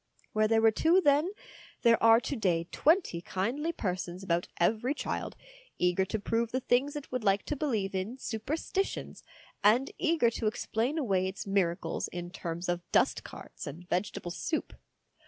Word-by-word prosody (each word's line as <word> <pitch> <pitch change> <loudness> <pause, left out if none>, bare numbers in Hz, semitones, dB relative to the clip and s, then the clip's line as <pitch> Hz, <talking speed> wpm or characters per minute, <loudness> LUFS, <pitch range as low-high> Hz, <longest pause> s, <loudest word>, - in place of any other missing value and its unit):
Where 215 0 +3
there 225 0 +3
were 225 - +7
two 325 - +4
then, 295 +1 +3 0.5
there 230 -1 +5
are 225 0 +7
to 280 - -3
day 180 -8 +1
twenty 315 - +2
kindly 240 - -2
persons 180 - -4
about 175 -2 0
every 225 +10 +2
child, - - -3 0.4
eager 180 +1 +2
to 220 - -2
prove 225 +2 -1
the 255 - 0
things 265 +4 +1
it 295 -2 -7
would 255 -2 -2
like 200 -1 +3
to 300 - -3
believe 225 -10 -1
in 190 +7 -3
superstitions, 285 - -3 0.4
and 235 +7 +4
eager 320 -9 +3
to 225 - -2
explain 230 +6 -1
away 195 -10 +1
its 190 +2 -5
miracles 175 -4 0
in 175 0 -6
terms 170 -1 -5
of 175 0 0
dustcarts - - -1
and 165 +5 -8
vegetable 180 -1 -2
soup. 315 - -3
220 Hz, 160 wpm, -30 LUFS, 185-270 Hz, 0.5 s, were